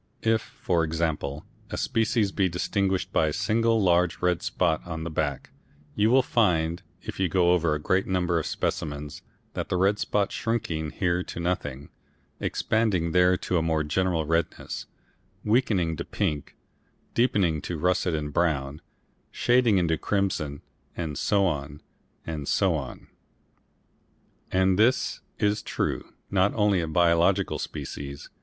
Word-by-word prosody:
If, 110 Hz, -1 st, +3 dB
for 85 Hz, -5 st, -1 dB
example, 80 Hz, -3 st, -2 dB, 0.2 s
a -, -, -4 dB
species 110 Hz, -2 st, +1 dB
be 95 Hz, -2 st, +1 dB
distinguished 95 Hz, +1 st, -1 dB
by 80 Hz, -, +3 dB
a 75 Hz, -, -1 dB
single 115 Hz, +3 st, +2 dB
large 90 Hz, -3 st, +2 dB
red 90 Hz, -1 st, +1 dB
spot 85 Hz, -4 st, 0 dB
on 80 Hz, -2 st, -5 dB
the 85 Hz, -, -4 dB
back, 75 Hz, -3 st, -2 dB, 0.4 s
you 105 Hz, +1 st, +2 dB
will 130 Hz, +2 st, +5 dB
find 85 Hz, -8 st, +1 dB, 0.2 s
if -, -, -7 dB
you 95 Hz, -2 st, +2 dB
go 90 Hz, -1 st, +3 dB
over 85 Hz, -3 st, +2 dB
a -, -, -3 dB
great 95 Hz, +5 st, +1 dB
number 90 Hz, -2 st, +1 dB
of 80 Hz, -, -3 dB
specimens 75 Hz, -1 st, -3 dB, 0.3 s
that -, -, -4 dB
red 95 Hz, +3 st, +2 dB
spot 100 Hz, -1 st, 0 dB
shrinking 85 Hz, -9 st, -2 dB
here 90 Hz, 0 st, 0 dB
to -, -, -7 dB
nothing, 75 Hz, -6 st, -3 dB, 0.5 s
expanding 100 Hz, -7 st, 0 dB
there 90 Hz, +1 st, +4 dB
to 90 Hz, -, +1 dB
a -, -, 0 dB
more 80 Hz, -1 st, +1 dB
general 85 Hz, +1 st, 0 dB
redness, 80 Hz, +2 st, -2 dB, 0.6 s
weakening 105 Hz, -8 st, +2 dB
to -, -, -3 dB
pink, 75 Hz, -2 st, -3 dB, 0.6 s
deepening 95 Hz, -10 st, +2 dB
to 85 Hz, -, -4 dB
russet 90 Hz, +1 st, +1 dB
and 75 Hz, -1 st, -4 dB
brown, 75 Hz, -3 st, 0 dB, 0.5 s
shading 120 Hz, -4 st, +3 dB
into 80 Hz, -3 st, +1 dB
crimson, 85 Hz, -8 st, -1 dB, 0.3 s
and 80 Hz, -4 st, -3 dB
so 100 Hz, +6 st, +2 dB
on, 75 Hz, -3 st, -2 dB, 0.5 s
and 75 Hz, -3 st, -5 dB
so -, -, +2 dB
on. -, -, -5 dB, 1.5 s
And 95 Hz, +1 st, +3 dB
this 120 Hz, +4 st, +2 dB, 0.2 s
is 105 Hz, 0 st, +1 dB
true -, -, -3 dB, 0.2 s
not 95 Hz, +1 st, +2 dB
only 105 Hz, -3 st, +3 dB
of 80 Hz, -1 st, -4 dB
biological 85 Hz, +3 st, +3 dB
species. 70 Hz, 0 st, -6 dB
90 Hz, 145 wpm, -26 LUFS, 80-100 Hz, 1.5 s, will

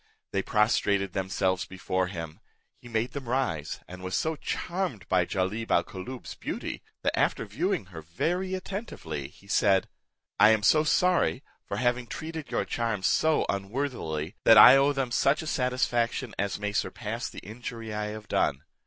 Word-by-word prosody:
They -, -, +1 dB
prostrated 100 Hz, -3 st, +1 dB
themselves 95 Hz, -1 st, 0 dB
before 95 Hz, 0 st, -2 dB
him: 80 Hz, -4 st, -7 dB, 0.4 s
he 120 Hz, -, -13 dB
made 115 Hz, +1 st, -1 dB
them 135 Hz, -4 st, -6 dB
rise; 90 Hz, -, -1 dB
and 90 Hz, +1 st, -10 dB
was 95 Hz, 0 st, -3 dB
so 160 Hz, 0 st, 0 dB
charmed 170 Hz, -, -3 dB
by 90 Hz, -2 st, +3 dB
Jalib 105 Hz, +4 st, -2 dB
al -, -, +4 dB
Koolloob's 120 Hz, +7 st, -8 dB
beauty, -, -, -5 dB, 0.2 s
that, -, -, +1 dB
after -, -, +1 dB
viewing -, -, -1 dB
her 80 Hz, -, -7 dB
very 175 Hz, -, -1 dB
attentively, 185 Hz, -, -5 dB
he 100 Hz, -, -20 dB
said, 100 Hz, -1 st, +3 dB, 0.5 s
"I 105 Hz, +1 st, +8 dB
am 110 Hz, -1 st, +3 dB
so 155 Hz, +7 st, +5 dB
sorry 175 Hz, -3 st, +2 dB, 0.2 s
for -, -, -3 dB
having 120 Hz, 0 st, 0 dB
treated 160 Hz, +1 st, -6 dB
your -, -, 0 dB
charms 115 Hz, -5 st, -2 dB
so 160 Hz, -1 st, +3 dB
unworthily, 100 Hz, -, -3 dB
that 115 Hz, -, +8 dB
I 125 Hz, +5 st, +11 dB
owe 140 Hz, +1 st, +4 dB
them 135 Hz, -3 st, -2 dB
such 140 Hz, +6 st, +2 dB
a -, -, -7 dB
satisfaction 125 Hz, -3 st, 0 dB
as 100 Hz, 0 st, -1 dB
may 105 Hz, 0 st, -2 dB
surpass -, -, -3 dB
the -, -, -14 dB
injury 115 Hz, +1 st, -7 dB
I 105 Hz, 0 st, -2 dB
have 110 Hz, 0 st, -7 dB
done. 65 Hz, -, +1 dB
110 Hz, 165 wpm, -28 LUFS, 95-135 Hz, 0.5 s, I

